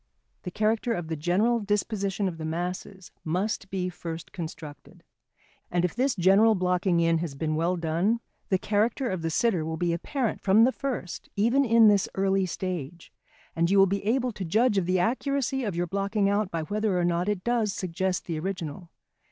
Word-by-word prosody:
The - - -5
character 220 +4 0
of 175 -6 -4
the 160 - -1
general 195 +10 +1
disposition 205 -1 -1
of 165 -3 -5
the - - -5
masses 180 +3 -5
must 190 +5 -2
be 185 -2 -2
first 170 -2 -7
constructed. 160 -3 -9 0.7
And 175 0 +1
if 180 - -2
this 260 +2 +1
general 200 +4 +5
blocking 180 -1 +1
in 165 -1 +3
has 160 -4 -4
been 155 +2 -2
well 165 +3 +1
done, 170 +8 0 0.3
the 190 - +3
character 220 +7 0
of 185 -2 -3
the 165 - -1
sitter 180 0 +1
will 160 +1 -3
be 175 0 0
apparent 240 - -2
from 205 +3 +5
the 255 - +4
first 260 -11 -5
even 235 +7 +3
in 230 -3 +6
this 200 -2 +3
early 195 0 +1
stage; 175 -3 -5 0.4
and 170 +1 +2
you 200 - +3
will 195 - +7
be 195 +1 -2
able 250 +4 +1
to 200 - -6
judge 210 +5 +2
of 175 - -3
the 185 0 +2
accuracy 265 +5 0
of 205 -6 -2
your 175 +1 0
blocking 200 +2 0
out 200 0 +1
by 165 -2 -3
whether 205 +2 -1
or 175 - +1
not 175 +2 0
it 200 -3 -2
does 235 -3 +1
suggest 185 0 -2
the 165 -3 -3
original. 175 -1 -5
190 Hz, 195 wpm, -27 LUFS, 170-215 Hz, 0.7 s, will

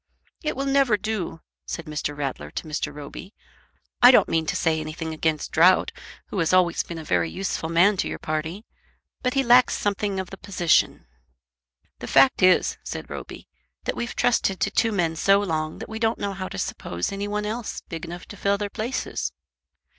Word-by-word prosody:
"It 305 - -2
will 270 +1 -2
never 270 -5 +3
do," 205 -6 -4 0.3
said 170 - -5
Mr. 150 -1 -4
Rattler 135 - -4
to 115 - -6
Mr. 155 0 -2
Roby. 150 +7 -9 0.7
"I 245 - +10
don't 250 - +6
mean 160 -1 0
to - - 0
say 160 -1 +1
anything 155 +1 -5
against 155 -1 -1
Drought, 180 +4 +5 0.4
who 195 - -3
has 165 0 +1
always 180 -2 +4
been 170 - -7
a 160 - -6
very 90 - +1
useful 180 - -3
man 185 +5 +4
to - - 0
your - - -4
party; 160 +7 -4 0.6
but 250 +1 -1
he 270 - +3
lacks 245 0 +5
something 200 -1 -1
of 190 - -5
the 195 - -8
position." 185 -4 +1 0.9
"The - - -7
fact 135 -1 +5
is," 185 -1 +4
said - - -6
Roby, - - -8 0.4
"that - - -2
we've 235 - -4
trusted 195 -5 +1
to 200 - +1
two 225 +1 +2
men 170 -5 0
so 195 +5 +4
long 155 -5 -2
that - - -7
we 220 0 -6
don't 225 0 +1
know 200 -1 -3
how 185 0 -5
to - - -7
suppose 85 -1 -3
any 200 +1 -3
one 210 0 -2
else 220 +1 -4
big 165 -1 -6
enough 175 +1 -7
to 205 - -9
fill 200 +2 +1
their 205 0 -4
places. 235 +4 -3
185 Hz, 195 wpm, -24 LUFS, 160-210 Hz, 0.9 s, I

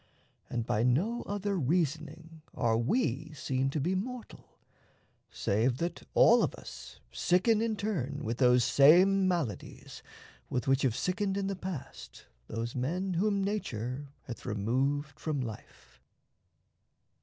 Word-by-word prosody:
And 120 -2 -2
by 105 - 0
no 170 - +1
other 205 0 -2
reasoning 160 +1 -2
are 115 -2 +2
we 145 - 0
Seen 135 -1 -1
to 150 - -2
be 170 +7 0
mortal, 235 +5 -6 0.7
save 115 +5 0
that 170 +4 -3
all 235 +1 +7
of - - 0
us - - -11
Sicken 210 +5 +2
in 225 -1 0
turn 150 - -3
with 115 0 -3
those 125 -1 +5
same 185 - +6
maladies 170 - -3 0.5
With 125 - -2
which 135 0 +3
have 125 -4 +1
sickened 195 +5 -1
in 200 - -1
the 195 0 -2
past 185 -6 -8 0.2
those 115 +1 -4
men 180 +9 -2
Whom 200 +3 +1
nature 140 - -3 0.2
hath 120 - -8
removed 135 +7 -1
from 155 -3 -2
life. 105 - -9
150 Hz, 130 wpm, -30 LUFS, 125-190 Hz, 0.7 s, all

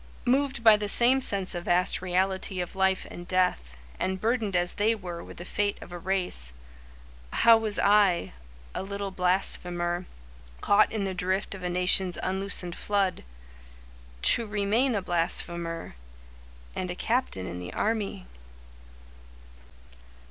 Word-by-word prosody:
Moved 265 -1 +1
by 220 -2 +8
the 205 -1 -3
same 250 +5 +4
sense 195 -6 -1
of 175 -1 -5
vast 180 +1 +2
reality 185 +1 0
Of 180 +1 -4
life 190 0 +1
and 175 0 -9
death, 180 - 0 0.2
and 190 0 -1
burdened 220 -2 0
as 175 0 +1
they 220 +2 +2
were 175 -5 -7
With - - -12
the 175 - -8
fate 205 +1 -1
of - - -11
a 175 - -6
race, 180 - -1 0.8
How 230 0 +6
was 220 -2 -1
I, 200 - +3 0.4
a - - -3
little 200 0 -4
blasphemer, 180 -1 0 0.5
Caught 205 +1 +4
in 215 -2 -2
the 190 -1 -2
drift 185 +2 -1
of 190 - -9
a 180 - -2
nation's 180 +1 +2
unloosened 190 -2 -3
flood, 200 -3 -1 1.0
To 230 - +4
remain 215 +5 +1
a 200 - -1
blasphemer, 170 -1 -2 0.8
And 185 - -3
a 175 - -4
captain 225 - -1
in 90 0 -6
the 90 - -7
army? 210 - -2
190 Hz, 140 wpm, -27 LUFS, 175-205 Hz, 1.0 s, by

